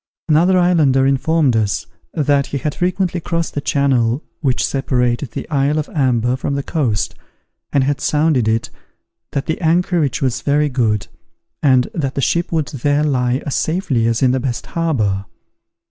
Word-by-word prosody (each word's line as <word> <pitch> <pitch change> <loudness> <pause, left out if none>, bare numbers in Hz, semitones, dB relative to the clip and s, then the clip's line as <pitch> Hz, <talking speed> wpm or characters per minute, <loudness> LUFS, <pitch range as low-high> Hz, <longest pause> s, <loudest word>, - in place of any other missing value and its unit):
Another 170 +4 +4
islander 155 -7 +3
informed 140 0 +2
us, 105 -3 0 0.3
that 145 -2 +2
he 140 - -3
had 145 +2 -2
frequently 180 0 -1
crossed 170 0 -2
the 145 - -2
channel 135 -2 +1 0.2
which 135 -5 0
separates 125 -1 0
the - - -7
isle 145 +1 +1
of 155 - -1
Amber 125 -4 +1
from 140 +2 -3
the 140 - -2
coast, 125 -12 -1 0.6
and 140 - +2
had 140 +1 -1
sounded 150 -6 +2
it, 110 +1 0 0.6
that 140 - -1
the 160 - -3
anchorage 165 -4 +1
was 130 -3 -1
very 150 +1 +1
good, 110 -6 0 0.6
and 130 -3 +4
that 135 -5 -2
the - - -2
ship 170 +6 0
would 160 -4 0
there 145 +2 0
lie 130 -2 0
as 145 - -2
safely 150 -9 0
as 115 +2 0
in 130 - +4
the 130 - +1
best 125 -2 -3
harbour. 110 -13 0
140 Hz, 165 wpm, -18 LUFS, 125-155 Hz, 0.6 s, Another